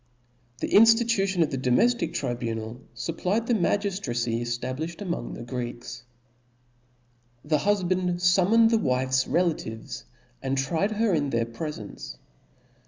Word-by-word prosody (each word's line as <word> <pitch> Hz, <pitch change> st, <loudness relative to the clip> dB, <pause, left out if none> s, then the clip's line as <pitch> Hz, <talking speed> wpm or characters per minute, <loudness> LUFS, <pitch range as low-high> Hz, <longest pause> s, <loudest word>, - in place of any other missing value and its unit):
The -, -, -1 dB
inftitution 225 Hz, -5 st, +5 dB
of 155 Hz, -, -2 dB
the 135 Hz, -, -2 dB
domeftic 230 Hz, -, +2 dB
tribunal 115 Hz, 0 st, -3 dB
§ 120 Hz, +8 st, -3 dB
fupplied 200 Hz, +7 st, 0 dB
the 240 Hz, -, +1 dB
magiftracy. 170 Hz, -, 0 dB
cftablilhed 130 Hz, +7 st, -3 dB
ampng 180 Hz, -2 st, -4 dB
the -, -, -7 dB
Greeks 120 Hz, -1 st, -6 dB, 0.7 s
||. 120 Hz, 0 st, -34 dB
The 150 Hz, 0 st, +2 dB
hulband 185 Hz, -1 st, +1 dB
fummoncd 190 Hz, +6 st, +4 dB
the 225 Hz, -, +4 dB
wife's 130 Hz, -3 st, +1 dB
relations^ 115 Hz, -9 st, -2 dB, 0.4 s
and 135 Hz, 0 st, -1 dB
tried 160 Hz, +10 st, 0 dB
her 215 Hz, -2 st, +1 dB
in 145 Hz, -3 st, +1 dB
their 115 Hz, -2 st, 0 dB
prefence 115 Hz, -, -7 dB
J. -, -, -30 dB
145 Hz, 130 wpm, -26 LUFS, 120-190 Hz, 0.7 s, inftitution